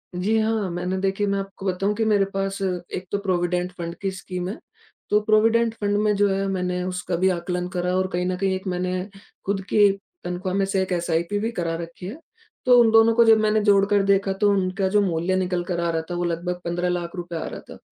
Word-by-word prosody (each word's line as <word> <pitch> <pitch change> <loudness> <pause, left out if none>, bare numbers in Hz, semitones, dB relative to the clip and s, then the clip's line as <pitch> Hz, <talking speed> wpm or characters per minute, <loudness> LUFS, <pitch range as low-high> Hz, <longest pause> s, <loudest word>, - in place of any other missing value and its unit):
जी 200 +5 +1
हाँ, 220 -3 0
मैंने 180 +2 -2
देखिए, 195 +1 0
मैं 200 0 0
आपको 195 0 -7
बताऊँ 195 +2 0
कि 225 +1 0
मेरे 205 -2 +3
पास 195 0 -2
एक 180 -1 -3
तो 200 - +1
प्रोविडेंट 180 -2 -1
फण्ड 170 -1 -5
की 195 - 0
स्कीम 185 -1 -5
है, 210 - -5 0.5
तो 210 - +4
प्रोविडेंट 225 +2 +3
फण्ड 205 0 +1
में 210 0 +2
जो 205 0 +3
है 195 0 0
मैंने 180 -1 -1
उसका 180 -1 -3
भी 190 +2 +3
आकलन 180 0 -2
करा 180 +1 0
और 185 0 +1
कहीं 180 0 0
न 185 0 0
कहीं 190 0 0
एक 190 +1 -6
मैंने 180 0 -1 0.5
खुद 195 0 -1
की 205 -1 +5 0.3
तनख्वाह 180 +1 -3
में 195 0 +2
से 195 0 0
1 190 - -3
एसआईपी 170 +3 0
भी 225 +3 -1
करा 170 -6 -2
रखी 170 +1 -9
है। 220 - -7 0.5
तो 250 -1 +7
उन 225 -1 +4
दोनों 225 0 +6
को 235 - +6
जब 225 -1 +7
मैंने 215 0 +2
जोड़ 200 -1 +4
कर 205 0 +2
देखा, 195 0 +2
तो 205 +2 +2
उनका 190 0 0
जो 205 +2 +3
मूल्य 180 -1 0
निकल 180 -1 0
कर 175 -1 -3
आ - - +1
रहा 165 0 -1
था - - -2
वो 175 - -1
लगभग 175 +1 -2
15 175 +1 -1
लाख 175 0 -3
रुपए 175 -1 -6
आ 160 - -3
रहा - - -7
था। - - -10
190 Hz, 240 wpm, -23 LUFS, 180-205 Hz, 0.5 s, तो